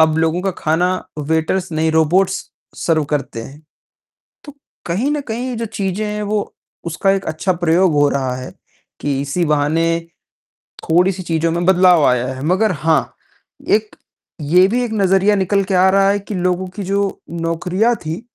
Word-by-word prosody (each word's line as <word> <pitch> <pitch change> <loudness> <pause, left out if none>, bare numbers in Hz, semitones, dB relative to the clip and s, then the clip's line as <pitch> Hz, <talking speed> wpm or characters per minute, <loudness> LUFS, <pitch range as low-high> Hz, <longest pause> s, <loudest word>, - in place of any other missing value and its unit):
अब 160 0 +4
लोगों 160 +2 +1
का 195 - 0
खाना 165 +4 +1 0.3
वेटर्स 160 +5 -1
नहीं, 160 +1 +1
रोबॉट्स 180 +5 +2 0.3
सर्व 160 -3 +1
करते 140 -5 -3
हैं। 140 +6 -12 0.8
तो 290 -2 -11 0.3
कहीं 205 +12 0
न 295 -1 -1
कहीं 245 +3 -3
जो 230 0 -3
चीज़ें 200 0 -3
हैं, 210 0 -3
वो 205 0 -2 0.3
उसका 170 +3 0
एक 195 0 0
अच्छा 160 +4 -1
प्रयोग 175 +2 +3
हो 145 -1 +3
रहा 130 -3 -1
है, 130 0 -8 0.5
कि 140 -2 -1
इसी 145 +5 -1
बहाने 150 +2 +1 1.0
थोड़ी-सी 180 +3 +2
चीज़ों 165 -1 0
में 175 +1 -1
बदलाव 180 -4 +5
आया 125 -1 +2
है। 130 - -8
मगर 190 +5 +2
हाँ, 160 0 0 0.5
एक 215 0 +1 0.5
ये 180 +4 +6
भी 245 +4 0
एक 235 - -4
नज़रिया 195 0 +3
निकल 195 +1 +1
के 190 0 -2
आ 185 +1 +5
रहा 195 0 +3
है 200 - +1
कि 200 +1 -7
लोगों 180 0 -1
की 205 - -4
जो 200 +1 -1
नौकरियाँ 175 +7 0
थीं 160 +4 -4
180 Hz, 170 wpm, -18 LUFS, 160-195 Hz, 1.0 s, ये